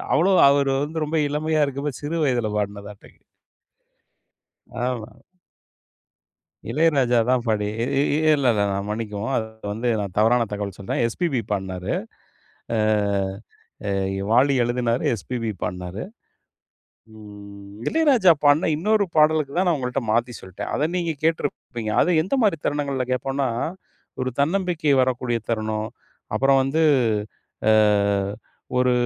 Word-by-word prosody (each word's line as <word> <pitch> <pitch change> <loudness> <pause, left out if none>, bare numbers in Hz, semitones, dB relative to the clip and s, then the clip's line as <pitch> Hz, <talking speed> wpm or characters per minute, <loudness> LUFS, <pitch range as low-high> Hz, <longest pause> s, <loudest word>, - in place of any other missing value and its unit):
அவ்வளாவா 185 +3 +4
அவர் 140 -1 +2
வந்து 155 +1 -3
ரொம்ப 155 +1 -1
இளமையா 155 +1 +1
இருக்கப்ப, 140 0 -4
சிறு 165 +3 -2
வயதுல 120 -5 0
பாடுன 100 0 -4
பாட்டு 105 - -15 1.7
ஆமா. 120 -2 -4 1.6
இளையராஜா 135 -4 +3
தான் 125 -1 +1
பாடி 105 -2 0
இ - - +1 0.2
இ 145 0 +1 0.2
இல்ல 135 -3 +1
இல்ல 100 - +2
நான் 100 +1 -3
மன்னிக்கவும். 105 +2 -3
அது 110 - -1 0.3
வந்து 120 +3 -2
நான் 100 -3 -5
தவறான 115 +2 +3
தகவல் 100 -2 -4
சொல்றேன். 100 +4 -2
எஸ்பிபி 135 0 -1
பாடுனாரு. 95 -2 -3 0.8
அ - - +1 1.1
அ - - 0 0.3
எ - - -3
வாலி 135 +4 +4
எழுதுனாரு, 120 0 -1
எஸ்பிபி 115 +1 -4
பாடுனாரு. 90 +2 -4 1.1
ம் 100 -1 -12
இளையராஜா 270 - +4
பாடுன 145 +2 +4
இன்னொரு 210 +3 +2
பாடலுக்கு 155 -2 +3
தான் 185 0 +2
நான் 170 - +3
உங்கள்கிட்ட 125 -1 -2
மாத்தி 120 +2 +1
சொல்லிட்டேன். 95 -1 -7
அத 150 +2 +1
நீங்க 170 -2 -1
கேட்டுருப்பீங்க, 135 -8 -2
அத 180 - +2
எந்த 190 - -1
மாரி 195 -6 +2
தருணங்கள்ல 140 -3 -1
கேட்போம்னா? 135 +2 -1 0.7
ஒரு 130 - -1
தன்னம்பிக்கை 165 -2 +1
வரக்கூடிய 125 -2 0
தருணம். 110 -1 -2 0.5
அப்புறம் 135 0 +4
வந்து, 155 +4 +1 0.9
அ - - +6 1.1
ஒரு 125 0 +3
125 Hz, 125 wpm, -23 LUFS, 110-150 Hz, 1.7 s, அ